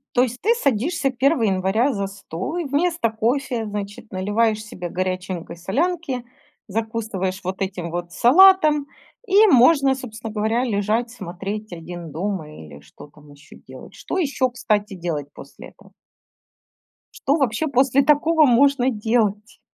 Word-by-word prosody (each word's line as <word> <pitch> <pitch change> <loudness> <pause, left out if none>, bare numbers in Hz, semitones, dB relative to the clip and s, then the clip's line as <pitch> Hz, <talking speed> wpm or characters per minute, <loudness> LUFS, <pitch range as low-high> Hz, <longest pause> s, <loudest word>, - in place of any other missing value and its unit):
То 250 - +5
есть 245 0 -4
ты 455 +4 +3
садишься 275 - 0
1 265 0 +1
января 200 +7 +1
за 200 -1 -2
стол 195 - -6
и 345 - -2
вместо 305 -2 0
кофе, 235 +1 -1
значит, 205 +1 -7
наливаешь 215 +3 0
себе 180 -5 -7
горяченькой 185 -2 -4
солянки, 275 - -2 0.4
закусываешь 215 -3 -3
вот 190 +2 -5
этим 185 -3 -3
вот 175 0 -5
салатом 305 - +5 0.4
и 410 +2 +6
можно, 275 - +5
собственно 225 -4 -8
говоря, 220 +3 0
лежать, 220 +1 0
смотреть 200 0 -6
"Один 170 -1 -8
дома" 170 -1 -4
или 75 - -12
что 75 - -15
там 150 0 -19
ещё 145 +1 -16
делать. - - -12
Что - - -5
ещё, 275 -6 0
кстати, 210 -4 -1
делать 165 -5 -4
после - - -12
этого? - - -21 1.2
Что 280 - 0
вообще 270 +1 0
после 270 0 +3
такого 305 +2 +4
можно 265 +1 +4
делать? 215 -1 -1
220 Hz, 140 wpm, -22 LUFS, 190-270 Hz, 1.2 s, и